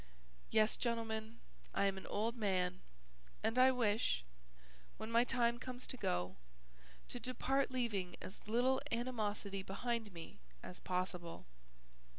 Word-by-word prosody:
"Yes, 215 0 +4
gentlemen, 225 -1 -1 0.4
I - - +4
am 195 -1 +2
an 190 - -7
old 225 +3 0
man, 185 -5 +1 0.6
and 230 +3 +2
I 260 +1 +9
wish, 220 - +2 0.7
when 220 - -5
my 235 +1 +6
time 240 -1 +2
comes 255 0 -5
to - - -4
go, 90 - -1 0.7
to 245 - -4
depart 260 +3 +1
leaving 210 -9 -1
as 190 - -9
little 245 +4 +3
animosity 215 -5 -1
behind 220 +3 -2
me 170 -2 -9 0.2
as 180 - -7
possible. 180 -2 -2
220 Hz, 130 wpm, -38 LUFS, 190-245 Hz, 0.7 s, I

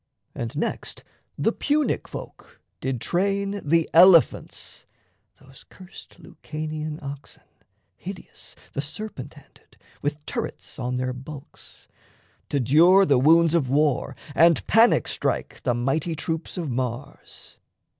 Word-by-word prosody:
And - - -5
next - - -4 0.3
The - - +1
Punic 295 0 0
folk - - -10 0.2
did 130 -2 -3
train 200 - -1
the 165 +2 +2
elephants 170 -1 +4 0.5
Those 135 0 -16
curst 185 -1 -14
Lucanian 155 -1 -6
oxen, 140 0 -9 0.5
hideous, - - -10 0.2
The 140 - -2
serpent 150 -1 -7
handed, - - -21 0.2
with 145 +1 -3
turrets - - -5
on 125 0 -2
their 130 0 -2
bulks 135 +2 -12 0.6
To 145 - 0
dure 170 - +5
the 140 -7 +3
wounds 165 +4 +5
of 150 -7 +1
war 145 -1 +1 0.2
and 165 +2 +4
panic 230 +2 +4
strike - - -2
The 125 -3 0
mighty 145 +7 -1
troops 160 +3 -4
of 165 -6 -3
Mars. 125 +2 -6
155 Hz, 120 wpm, -24 LUFS, 135-170 Hz, 0.6 s, dure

